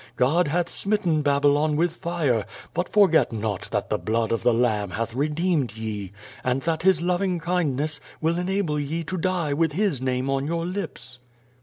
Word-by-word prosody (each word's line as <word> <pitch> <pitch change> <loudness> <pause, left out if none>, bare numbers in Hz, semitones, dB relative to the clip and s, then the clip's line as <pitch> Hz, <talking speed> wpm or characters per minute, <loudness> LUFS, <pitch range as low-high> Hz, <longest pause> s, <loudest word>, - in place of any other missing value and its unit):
God 145 +8 +3
hath 170 +3 0
smitten 185 -7 0
Babylon 145 +1 +3
with 170 +2 +2
fire, 155 - 0 0.3
but 175 +2 -1
forget 195 -10 +4
not 110 -3 -3
that - - -2
the - - +1
blood 110 +5 0
of 115 - 0
the 120 - +4
Lamb 110 -4 +1
hath 115 +4 -3
redeemed 150 - 0
ye, 105 -4 -4 0.3
and 130 0 0
that 160 -1 0
His 180 -2 +3
loving 180 +1 +1
kindness 155 -4 -1 0.2
will 165 +2 +1
enable 180 -4 0
ye 155 +4 -2
to 175 +4 -4
die 175 -4 0
with 160 +1 +1
His 185 - +1
name 130 0 -1
on 135 +1 0
your 165 +1 -1
lips." 125 -9 -6
150 Hz, 175 wpm, -24 LUFS, 125-175 Hz, 0.3 s, forget